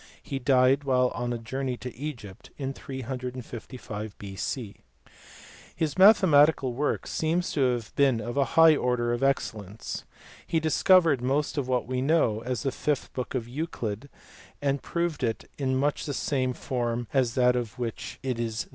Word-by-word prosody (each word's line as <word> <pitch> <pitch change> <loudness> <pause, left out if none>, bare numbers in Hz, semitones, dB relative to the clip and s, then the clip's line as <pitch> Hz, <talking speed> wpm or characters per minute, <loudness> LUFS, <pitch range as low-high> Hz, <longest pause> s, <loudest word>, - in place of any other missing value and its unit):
He 135 - -4
died 130 +1 +4
while 125 -2 +3
on 120 +1 -3
a 120 - -1
journey 125 +2 -3
to 125 0 -7
Egypt 120 -9 -7
in 135 -1 -3
355 125 -5 -6
B.C. 100 +3 -5 1.0
His 155 -3 -1
mathematical 160 - +6
work 145 +4 -1
seems 170 +3 -1
to 130 -4 +2
have 115 -3 -5
been 135 -5 +3
of 120 +2 -5
a 140 - +4
high 165 -1 +8
order 125 -3 0
of 120 - -2
excellence. 110 -7 -2 0.4
He 165 - +1
discovered 160 -2 +4
most 140 +4 0
of 140 -4 -1
what 125 -1 0
we 125 +1 -2
now 150 +5 +3
know 110 -8 +1
as 125 -2 -3
the 135 - 0
fifth 145 +1 -2
book 125 +1 -4
of 120 -3 -2
Euclid, 125 -4 -4 0.5
and 140 -1 0
proved 170 -4 -2
it 115 -2 -2
in 130 -2 0
much 145 +3 0
the 145 - -2
same 130 -3 0
form 120 -2 -2
as 125 -4 +2
that 125 -1 +4
in 120 -1 0
which 120 -3 -5
it 130 -3 -2
is 115 -1 -2
there - - -19
given. - - -25
130 Hz, 175 wpm, -27 LUFS, 120-145 Hz, 1.0 s, high